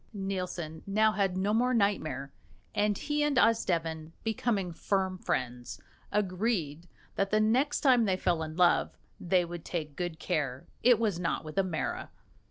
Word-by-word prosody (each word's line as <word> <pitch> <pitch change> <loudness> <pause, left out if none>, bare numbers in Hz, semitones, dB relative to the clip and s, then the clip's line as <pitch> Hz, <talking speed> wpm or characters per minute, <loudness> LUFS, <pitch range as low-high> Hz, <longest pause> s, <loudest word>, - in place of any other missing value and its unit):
Nielsen 180 -5 -4
now 215 +2 +3
had 195 -3 0
no 200 +3 +1
more 250 +3 +2
nightmare, 155 -10 0 0.4
and 210 0 +1
he 295 0 -1
and 295 -3 +1
Osdeven, 165 -9 +1
becoming 215 -4 -1
firm 190 +1 -1
friends, 125 -5 -3 0.3
agreed 185 -5 -1 0.3
that 195 0 +1
the 215 - +3
next 255 +7 +2
time 250 -5 +5
they 190 -2 +1
fell 175 -3 +1
in 155 0 -5
love 180 -1 +3 0.2
they 180 0 +2
would 170 -1 -7
take 155 -4 -4
good 175 -1 -3
care 145 -7 -2 0.2
it 245 -2 +6
was 210 -6 0
not 170 -2 -1
with 155 - -8
a - - +4
mara. 175 -4 -3
185 Hz, 160 wpm, -30 LUFS, 165-215 Hz, 0.4 s, it